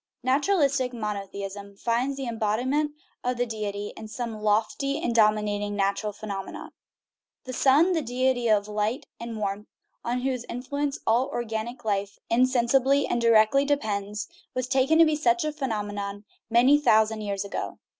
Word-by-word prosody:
Naturalistic 275 -2 +2
monotheism 200 -2 -5
finds 245 +5 0
the 270 - -4
embodiment 245 +7 0 0.3
of 250 0 -1
the 245 - +1
deity 205 -2 -4
in 220 - -8
some 225 -1 -5
lofty 220 +7 +1
and 240 - -1
dominating 210 -2 +2
natural 200 +1 0
phenomenon. 200 -2 -7 0.7
The 255 - -7
sun, 285 +8 +4
the 325 - +1
deity 250 -1 0
of 210 -2 +3
light 210 +4 -2
and 235 -1 -6
warmth, 205 0 -3 0.4
on 245 +1 -1
whose 255 -2 -1
influence 280 +3 -3
all 240 +4 +3
organic 235 +1 -4
life 200 -1 -1
insensibly 255 +3 +3
and 240 - -1
directly 230 +3 +5
depends, 210 -7 -1 0.3
was 255 -1 -1
taken 270 +4 +3
to 330 - +8
be 310 -1 +2
such 345 +2 +2
a 305 - -1
phenomenon 205 -7 -4 0.2
many 250 +5 +5
thousand 220 -5 +3
years 200 -1 -3
ago. 200 - -5
235 Hz, 145 wpm, -26 LUFS, 210-265 Hz, 0.7 s, to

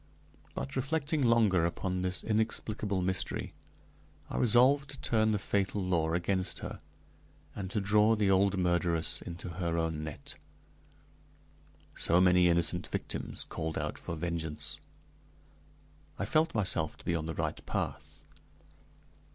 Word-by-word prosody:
But 140 - -4
reflecting 150 +3 0
longer 110 -7 +4
upon 90 +2 -1
this 90 -1 -2
inexplicable 105 -3 -1
mystery, 95 +1 -1 0.8
I - - -3
resolved 130 +4 +5
to 135 - -6
turn 110 -1 +2
the 105 - +2
fatal 100 0 -1
law 85 -4 0
against 90 +2 0
her, - - -6 0.8
and 95 -2 -5
to 105 - -1
draw 105 +2 +4
the 105 -2 +2
old 95 +1 +3
murderess 85 -2 +1
into 85 +1 -7
her 85 -2 -1
own 80 -2 -1
net. 80 -1 -8 1.6
So 85 - +2
many 90 -1 +5
innocent 85 -1 +1
victims - - -4
called 80 0 -4
out - - -3
for 85 - -5
vengeance! 80 -3 -4 1.4
I 100 - -2
felt 155 +7 +2
myself 90 -7 +1
to - - -17
be 85 - 0
on 80 -2 -2
the 80 - -4
right - - -3
path. - - -4
95 Hz, 135 wpm, -31 LUFS, 85-110 Hz, 1.6 s, resolved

